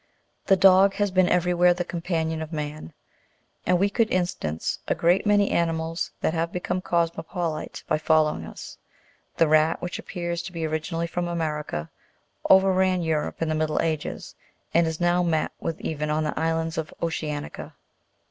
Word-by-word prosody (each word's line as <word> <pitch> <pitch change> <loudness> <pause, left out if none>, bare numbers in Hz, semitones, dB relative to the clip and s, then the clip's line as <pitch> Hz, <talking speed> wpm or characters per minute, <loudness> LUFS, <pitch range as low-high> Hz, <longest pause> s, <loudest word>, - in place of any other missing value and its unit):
The 195 - +6
dog 195 +1 +6
has 205 -2 0
been 185 -1 +3
everywhere 180 0 +3
the 175 0 -2
companion 165 -2 -2
of 160 0 -6
man, 150 - -5 0.8
and 180 - +4
we 195 +3 +3
could 220 +2 +1
instance 130 - -2
a - - +1
great 175 +5 +2
many 205 -1 +3
ani 170 -1 +2
mals 165 +1 -3
that - - +1
have 165 0 -1
become 180 +1 -2
cosmopolite 170 -1 -2
by - - +1
following 155 - +2
us; 80 - -10 0.6
the 165 - +4
rat, 155 +1 +3
which 180 - -5
appears 170 -2 -4
to 180 - -8
be 165 -2 -3
originally 160 +2 -2
from 175 +1 -3
America, 150 - -3 0.6
overran 190 -1 +4
Europe 160 0 -1
in - - -1
the - - +1
middle 155 0 0
ages, 155 -2 -3 0.4
and 170 0 +4
is 160 -1 -3
now 175 0 +2
met 165 -3 0
with 165 - -4
even 150 -1 -3
on 155 +1 +1
the 150 - -2
islands 165 0 -1
of 160 - -5
Ocea'nica. 150 -3 -4
165 Hz, 165 wpm, -25 LUFS, 155-180 Hz, 0.8 s, The